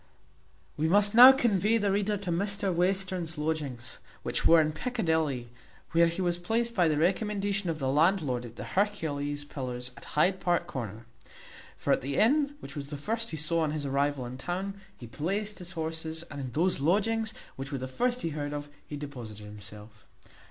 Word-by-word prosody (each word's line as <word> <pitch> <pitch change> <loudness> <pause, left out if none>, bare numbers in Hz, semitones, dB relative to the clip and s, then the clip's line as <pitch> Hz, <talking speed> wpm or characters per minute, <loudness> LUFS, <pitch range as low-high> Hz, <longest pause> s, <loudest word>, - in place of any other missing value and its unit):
We 155 - +1
must 205 +3 +4
now 250 +3 +11
convey 225 -4 +2
the 205 -3 +1
reader 205 +1 +1
to 190 -3 -4
Mr 200 +2 0
Western's 180 -2 0
lodgings, 145 -5 -3 0.2
which - - +1
were 165 - +8
in 155 -1 +2
Piccadilly, 160 - -1 0.4
where 170 +1 +5
he 170 +3 -2
was 175 -1 0
placed 230 +6 0
by 180 -6 +3
the 155 -2 +1
recommendation 200 +2 0
of 160 - -1
the 135 -3 -2
landlord 150 -3 +2
at 120 -1 -10
the - - -6
Hercules 145 -8 -1
Pillars 125 -3 -5
at 140 - -12
Hyde 185 +5 +4
Park 175 -1 +1
Corner; 115 -3 -6 0.7
for - - +1
at - - +1
the 135 +1 -3
inn, 285 +6 +3
which - - -9
was 140 -2 -5
the 145 0 -6
first 225 +10 -2
he 160 - -4
saw 155 +2 +1
on 160 -2 +1
his 150 -2 -3
arrival 140 -1 0
in 125 +2 -7
town, 185 +7 -3 0.2
he 120 - -9
placed 200 - -3
his 180 0 -5
horses, 160 -1 -3
and 140 -1 -5
in 130 -2 -5
those 175 +2 +2
lodgings, 215 +8 +2 0.2
which 135 +2 -6
were 140 - -2
the 130 0 -4
first 245 - -1
he 165 - 0
heard 145 -1 -4
of, 145 0 -5 0.2
he 145 - -5
deposited 120 -8 -8
himself. 105 +1 -11
160 Hz, 190 wpm, -29 LUFS, 140-200 Hz, 0.7 s, now